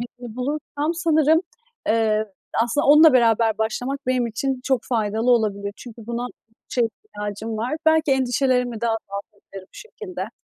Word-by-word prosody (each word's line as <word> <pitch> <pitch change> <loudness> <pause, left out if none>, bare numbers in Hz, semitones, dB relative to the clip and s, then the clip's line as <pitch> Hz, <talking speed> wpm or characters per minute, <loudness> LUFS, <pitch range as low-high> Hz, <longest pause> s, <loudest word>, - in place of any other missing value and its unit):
birini 240 -1 -9
bulursam 295 +4 -2
sanırım, 320 -2 +3 0.5
eee, 220 -1 +2 0.4
aslında, 240 +5 0
onunla 300 +1 +8
beraber 230 -3 +3
başlamak 245 +5 -2
benim 255 -1 +1
için 255 +3 -2
çok 265 -3 +1
faydalı 225 0 0
olabilir. 205 -4 +1
Çünkü 230 -2 -11
buna 240 +1 -3 0.4
çok 245 -2 +1
ihtiyacım 220 - -6
var. 240 +7 -2
Belki 315 -3 +4
endişelerimi 250 -2 +1
de 235 - 0
azaltabilirim 200 -3 -6
bu - - -16
şekilde. 440 -5 -7
240 Hz, 140 wpm, -22 LUFS, 220-275 Hz, 0.5 s, onunla